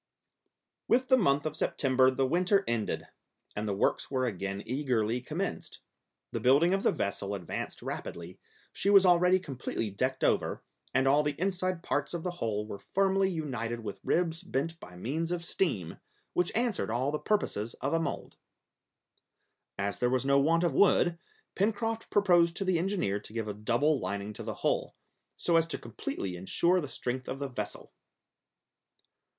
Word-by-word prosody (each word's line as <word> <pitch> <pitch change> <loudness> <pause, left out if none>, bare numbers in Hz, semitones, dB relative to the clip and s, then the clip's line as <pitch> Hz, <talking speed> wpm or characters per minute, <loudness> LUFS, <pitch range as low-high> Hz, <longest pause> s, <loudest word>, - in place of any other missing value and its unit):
With 250 +1 +2
the 260 - +7
month 145 - +2
of 155 -1 -2
September 130 -4 +3
the 130 +1 +1
winter 180 +7 +2
ended, 115 -2 -1 0.5
and 105 +1 -2
the 100 - -1
works - - +1
were 130 -2 0
again 100 -2 -3
eagerly 125 -3 0
commenced. 125 - -4 0.5
The - - -2
building 145 +8 +4
of 195 - +1
the - - +3
vessel 100 0 -2
advanced 90 -4 -5
rapidly, 85 +2 -6 0.3
she 200 - 0
was 195 -1 +7
already 180 +1 +5
completely 130 - -4
decked 130 +6 -1
over, - - +1 0.3
and 130 0 +2
all 145 +2 +5
the 150 -1 -2
inside 185 -1 -1
parts 145 +4 -1
of 165 - -4
the 180 - -1
hull 105 -2 -1
were 100 -2 -7
firmly 195 - +2
united 120 - -3
with 100 -3 -6
ribs 165 -1 +1
bent 165 +5 -3
by 90 - -11
means 155 - -2
of 170 -1 -2
steam, 105 - -1 0.3
which 180 0 +1
answered 235 - 0
all 125 +5 0
the 150 - -2
purposes 115 - -1
of 135 - -2
a 165 - +3
mould. 165 - -4 1.4
As 100 -1 -2
there 125 - +2
was 130 +1 +1
no 140 0 +4
want 165 +4 +3
of 170 -5 +2
wood, 175 0 +4 0.3
Pencroft 225 +3 -1
proposed 175 -4 +4
to 195 - -2
the 185 -3 +2
engineer 175 - 0
to 105 - -12
give 115 -2 -3
a 105 - -3
double 120 +8 +1
lining 100 -1 -3
to - - -8
the - - -4
hull, - - 0 0.4
so 170 -1 +2
as 165 0 +3
to 165 - -2
completely 100 -4 -5
insure 170 - +2
the 145 - -6
strength 125 0 -4
of 130 - -3
the 140 0 -4
vessel. 105 -5 -6
140 Hz, 170 wpm, -30 LUFS, 115-175 Hz, 1.4 s, the